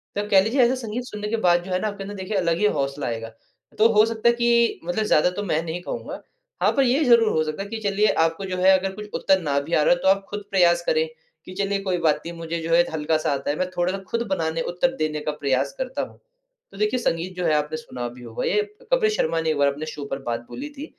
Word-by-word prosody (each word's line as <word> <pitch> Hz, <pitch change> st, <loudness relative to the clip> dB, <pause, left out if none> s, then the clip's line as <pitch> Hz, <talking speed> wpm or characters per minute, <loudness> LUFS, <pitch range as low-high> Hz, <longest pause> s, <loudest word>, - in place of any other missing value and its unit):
तो 205 Hz, +1 st, -2 dB
कह 195 Hz, -2 st, +6 dB
लीजिए 250 Hz, +5 st, +2 dB
ऐसा 245 Hz, +2 st, +3 dB
संगीत 230 Hz, +3 st, -4 dB
सुनने 210 Hz, -3 st, -6 dB
के 230 Hz, -, 0 dB
बाद 175 Hz, 0 st, +4 dB
जो 185 Hz, -, -8 dB
है 185 Hz, -, 0 dB
आपके 200 Hz, -2 st, -4 dB
अंदर 205 Hz, +1 st, -7 dB
देखिए 195 Hz, +1 st, -3 dB
अलग 170 Hz, -2 st, +1 dB
ही 210 Hz, -, +1 dB
हौसला 140 Hz, 0 st, -2 dB
आएगा। 115 Hz, -1 st, -4 dB, 0.5 s
तो 225 Hz, -, +7 dB
हो 215 Hz, +1 st, +6 dB
सकता 225 Hz, +1 st, +1 dB
है 235 Hz, -, +2 dB
कि 235 Hz, -1 st, +2 dB
मतलब 175 Hz, +5 st, -1 dB
ज़्यादा 180 Hz, -2 st, +4 dB
तो 205 Hz, -, -2 dB
मैं 160 Hz, -4 st, 0 dB
नहीं 170 Hz, +1 st, -4 dB
कहूँगा -, -, -6 dB, 0.4 s
हाँ, -, -, +5 dB
पर 275 Hz, -, +2 dB
ये 265 Hz, +5 st, +2 dB
ज़रूर 235 Hz, -3 st, +5 dB
हो 155 Hz, -, +2 dB
सकता 155 Hz, +5 st, -4 dB
है 200 Hz, -, -10 dB
कि 225 Hz, -, -4 dB
चलिए 205 Hz, 0 st, +1 dB, 0.2 s
आपको 165 Hz, +4 st, -1 dB
जो 185 Hz, -1 st, -3 dB
है 190 Hz, +1 st, +6 dB
अगर 195 Hz, +1 st, -3 dB
कुछ 210 Hz, 0 st, -8 dB
उत्तर 190 Hz, -1 st, +2 dB
ना 140 Hz, -2 st, 0 dB
भी 155 Hz, +4 st, -6 dB
आ 155 Hz, -, +4 dB
रहा -, -, +5 dB
है 175 Hz, -, -2 dB
तो -, -, 0 dB
आप 195 Hz, +1 st, +4 dB
खुद 205 Hz, 0 st, -5 dB
प्रयास 175 Hz, -3 st, +4 dB
करें 160 Hz, 0 st, +2 dB, 0.4 s
कि 185 Hz, -, -9 dB
चलिए 200 Hz, +1 st, -1 dB
कोई 180 Hz, -1 st, +1 dB
बात 150 Hz, -, +3 dB
नहीं 170 Hz, 0 st, -6 dB
मुझे 165 Hz, 0 st, -4 dB
जो 165 Hz, +1 st, -4 dB
है 170 Hz, -, +7 dB
हल्का-सा 155 Hz, -1 st, 0 dB
आता 140 Hz, +1 st, -3 dB
है, 145 Hz, -, +1 dB
मैं 185 Hz, 0 st, -1 dB
थोड़ा-सा 180 Hz, +2 st, -1 dB
खुद 235 Hz, -, 0 dB
बनाने 165 Hz, -3 st, -1 dB
उत्तर 260 Hz, +10 st, 0 dB
देने 155 Hz, -1 st, -1 dB
का 150 Hz, -, +2 dB
प्रयास 140 Hz, -2 st, -1 dB
करता 260 Hz, 0 st, -3 dB
हूँ। -, -, -7 dB, 0.5 s
तो 195 Hz, -, -13 dB
देखिए 210 Hz, +5 st, +1 dB
संगीत 180 Hz, -2 st, -2 dB
जो 180 Hz, -, -1 dB
है 155 Hz, -, +3 dB
आपने 150 Hz, +1 st, -1 dB
सुना 125 Hz, -6 st, -6 dB
भी 125 Hz, -, -12 dB
होगा 115 Hz, -1 st, -4 dB
ये 425 Hz, -, +2 dB, 0.3 s
कपिल 440 Hz, -4 st, +4 dB
शर्मा 165 Hz, -, 0 dB
ने 160 Hz, -, -1 dB
एक 155 Hz, -, 0 dB
बार 140 Hz, 0 st, +4 dB
अपने 145 Hz, +3 st, -2 dB
शो 150 Hz, -2 st, -6 dB
पर 135 Hz, -, -3 dB
बात 120 Hz, 0 st, -3 dB
बोली 290 Hz, +4 st, -6 dB
थी 290 Hz, -, -5 dB
180 Hz, 270 wpm, -23 LUFS, 155-210 Hz, 0.5 s, तो